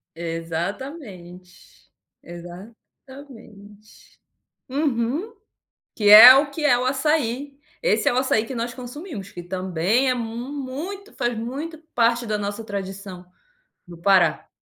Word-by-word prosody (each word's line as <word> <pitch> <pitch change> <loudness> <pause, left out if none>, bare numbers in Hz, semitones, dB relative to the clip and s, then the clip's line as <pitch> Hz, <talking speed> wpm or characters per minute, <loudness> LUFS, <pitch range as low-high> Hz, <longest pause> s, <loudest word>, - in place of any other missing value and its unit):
Exatamente, 175 - -7 0.3
exatamente. 210 - -14 0.5
Uhum. 285 - -2 0.6
Que 210 -4 +1
é 235 +5 +12
o 280 +1 +2
que 300 +2 -5
é 245 -5 +4
o 250 - -2
açaí. 275 0 -1 0.2
Esse - - +2
é - - +1
o - - -2
açaí 230 -4 +1
que 265 - -7
nós 235 0 -4
consumimos, 250 - -9
que 175 - -8
também 185 +7 -1
é - - +1
muito, 270 - -6
faz 240 -1 -2
muito 280 +8 -6 0.2
parte 235 0 +2
da 210 -1 -2
nossa 205 +2 -5
tradição 195 -2 -7 0.6
do 170 -1 -12
Pará. 190 +1 +2
235 Hz, 120 wpm, -22 LUFS, 195-270 Hz, 0.6 s, é